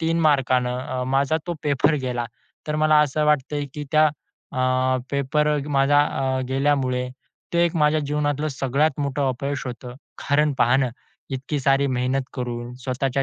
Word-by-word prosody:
3 165 +1 +1
मार्काने 130 -5 +2
अ, 125 0 -3
माझा 140 +4 +2
तो 175 - -2
पेपर 145 +2 +2
गेला. 120 -2 -2 0.4
तर 150 0 -1
मला 155 0 +4
असं 150 +1 +1
वाटतं 150 0 +1
आहे, 145 - -2
की 150 -1 -5
त्या 155 0 +6 0.5
अ, 130 0 +1
पेपर 145 +2 +1 0.2
माझा 145 0 +4
अ, 130 -2 -1
गेल्यामुळे, 130 -2 +1 0.4
ते 170 0 +3
एक 170 0 -1
माझ्या 150 0 +3
जीवनातलं 145 +1 -1
सगळ्यात 140 +2 0
मोठं 140 -1 0
अपयश 135 +2 -3
होतं. 125 0 -7 0.3
कारण 150 +1 +3
पहा 120 +2 +4
ना, 135 -2 +1 0.4
इतकी 135 +2 -3
सारी 135 +1 +3
मेहनत 130 +1 0
करून, 120 -1 -5
स्वतःच्या 135 +1 0
135 Hz, 160 wpm, -23 LUFS, 130-150 Hz, 0.5 s, त्या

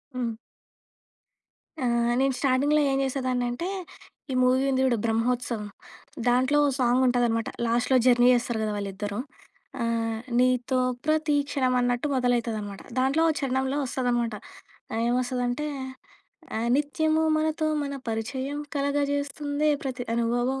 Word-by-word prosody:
హ్మ్. 240 -2 -1 1.5
ఆహ్, 235 0 +2
నేను 270 0 +2
స్టార్టింగ్‌లో 285 +3 +3
ఏం 270 - +1
చేసేదాన్నంటే, 255 +2 -1 0.6
ఈ - - -1
మూవీ 255 +1 +3
ఉంది 260 0 +1
చూడు 240 -3 +2
'బ్రహ్మొత్సవం'. 230 -1 -1 0.6
దాంట్లో 255 +4 +3
ఓ - - +2
సాంగుంటదనమాట. 245 -2 +2 0.2
లాస్ట్‌లో 240 +3 +2
జర్నీ 245 -1 +5
చేస్తారు 240 -2 0
గదా 215 -1 -1
వాళ్ళిద్దరూ. 200 +1 -4 0.6
ఆహ్, 225 -1 -1 0.2
నీతో 255 0 +2 0.3
ప్రతి 310 -1 +2
క్షణం 255 -3 +1
అన్నట్టు 245 +3 0
మొదలైతదనమాట. 230 -5 -1 0.2
దాంట్లో 275 +5 +2 0.2
చరణంలో 265 0 0
వస్తుందనమాట. 240 -3 -1 0.6
ఆహ్, 225 - -1
ఏమొస్తుందంటే, 250 +3 -1 0.9
ఆహ్, 230 +1 -1
నిత్యము 310 +2 +1
మనతో 310 0 0 0.2
మన 280 0 -4
పరిచయం, 260 +6 -3 0.2
కలగ 285 0 0 0.2
చేస్తుందే 285 +1 -1
ప్రతి 260 -2 -4
అనుభవం. 240 +3 0
250 Hz, 115 wpm, -26 LUFS, 235-275 Hz, 1.5 s, జర్నీ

